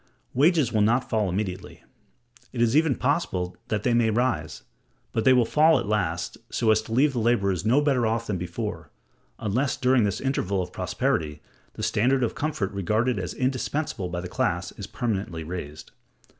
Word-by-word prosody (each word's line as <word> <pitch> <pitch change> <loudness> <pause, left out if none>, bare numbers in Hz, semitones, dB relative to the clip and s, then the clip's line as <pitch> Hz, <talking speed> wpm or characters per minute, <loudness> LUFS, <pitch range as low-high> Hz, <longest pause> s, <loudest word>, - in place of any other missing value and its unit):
Wages 150 -2 +3
will 110 - +3
not 120 +5 +2
fall 110 -4 +1
immediately: 95 0 -4 0.7
it 125 - -6
is 120 +2 +3
even 155 -3 +4
possible 105 - -1
that 105 -2 -2
they 125 - +2
may 120 -1 +3
rise; 110 -9 -1 0.5
but 110 - -1
they 130 - +7
will 125 -2 +5
fall 155 +6 +4
at - - -2
last, 90 -5 -2
so 115 -2 +2
as 110 0 +3
to 110 - -12
leave 135 +5 +3
the 120 - -1
laborers 100 -5 +1
no 130 +6 +4
better 135 -6 +2
off 115 +1 -1
than 95 -5 -2
before, 85 0 -5 0.5
unless 120 +6 -1
during 130 -2 +3
this 100 -2 0
interval 100 -8 -1
of 90 0 -4
prosperity 75 -1 -1 0.3
the 110 - -7
standard 120 +4 +2
of 115 - 0
comfort 140 -10 -2
regarded 110 +4 0
as 90 -3 -4
indispensable 130 - -2
by 90 0 -3
the 90 - -6
class - - -1
is - - -8
permanently 95 -8 -3
raised. 75 -3 -7
110 Hz, 180 wpm, -25 LUFS, 95-130 Hz, 0.7 s, they